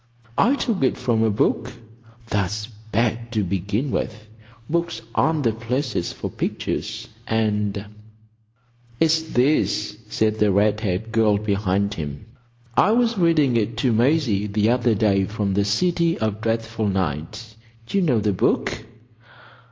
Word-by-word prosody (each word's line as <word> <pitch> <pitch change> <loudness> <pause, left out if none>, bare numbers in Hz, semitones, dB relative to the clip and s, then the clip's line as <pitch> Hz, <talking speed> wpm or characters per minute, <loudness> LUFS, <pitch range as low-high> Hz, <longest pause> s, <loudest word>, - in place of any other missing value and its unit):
"I 265 +4 +4
took 230 - -1
it 130 - +2
from 115 -3 +1
a 110 - +3
book." 105 - 0 0.6
"That's 105 0 -1 0.3
bad, 115 +1 0
to 110 -2 +1
begin 100 +8 -2
with. 110 0 -3 0.4
Books 170 +1 -1
aren't 155 -2 +2
the 115 - +3
places 120 -3 -2
for - - -5
pictures. - - -3 0.2
And——" 105 -2 0 1.1
"It's 160 0 +3
this," 135 -7 +1
said 110 0 0
the 105 -1 +4
red 105 +2 +2
haired 105 +1 -2
girl 110 -2 +3
behind 100 -1 0
him. 75 -5 -6 0.5
"I 210 - +4
was 235 -1 +2
reading 155 -7 +3
it 115 0 0
to 120 -1 +2
Maisie 120 -4 +2
the 105 +2 +2
other 120 -2 +2
day 100 -2 +2
from 105 -1 -2
The 100 +1 +1
City 170 - +1
of 110 -1 -2
Dreadful 115 -1 -1
Night. 95 +3 -3 0.3
D'you 195 +11 0
know 135 -10 +2
the 105 -1 +1
book?" 110 +4 0
110 Hz, 140 wpm, -22 LUFS, 105-125 Hz, 1.1 s, I